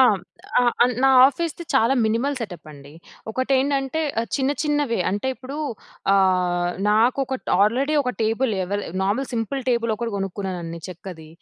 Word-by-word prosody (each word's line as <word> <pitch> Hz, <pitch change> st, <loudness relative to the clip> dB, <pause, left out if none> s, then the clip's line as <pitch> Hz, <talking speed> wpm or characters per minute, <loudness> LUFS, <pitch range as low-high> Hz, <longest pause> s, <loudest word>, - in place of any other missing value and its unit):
ఆ! -, -, +9 dB, 0.6 s
ఆ -, -, +5 dB, 0.2 s
ఆన్ 250 Hz, +1 st, +3 dB
నా -, -, +6 dB, 0.2 s
ఆఫీస్‌ది 335 Hz, +4 st, -3 dB
చాలా 265 Hz, 0 st, +4 dB
మినిమల్ 240 Hz, +6 st, 0 dB
సెటపండి. 155 Hz, -, -9 dB, 0.4 s
ఒకటెంటంటే 270 Hz, +3 st, 0 dB, 0.2 s
ఆహ్, 230 Hz, -, -3 dB
చిన్న 270 Hz, 0 st, +1 dB
చిన్న‌వే 290 Hz, -5 st, 0 dB
అంటే 205 Hz, +6 st, -2 dB
ఇప్పుడు 265 Hz, +3 st, -8 dB, 0.6 s
ఆహ్, 180 Hz, -2 st, +2 dB, 0.2 s
నాకు 230 Hz, +5 st, +3 dB
ఒకట్ 260 Hz, 0 st, -5 dB
ఆల్రెడీ 260 Hz, +9 st, +2 dB
ఒక 250 Hz, -, -1 dB
టేబుల్ 225 Hz, +2 st, +1 dB
ఎవెల్ 205 Hz, +3 st, -2 dB, 0.2 s
నార్మల్ 215 Hz, +8 st, 0 dB
సింపుల్ 235 Hz, +4 st, -2 dB
టేబుల్ 235 Hz, -2 st, +1 dB
ఒకటి 235 Hz, +1 st, -3 dB
కొనుక్కున్నానండి 185 Hz, -4 st, -4 dB
చెక్కది, 175 Hz, -3 st, -9 dB
230 Hz, 140 wpm, -23 LUFS, 190-265 Hz, 0.6 s, ఆ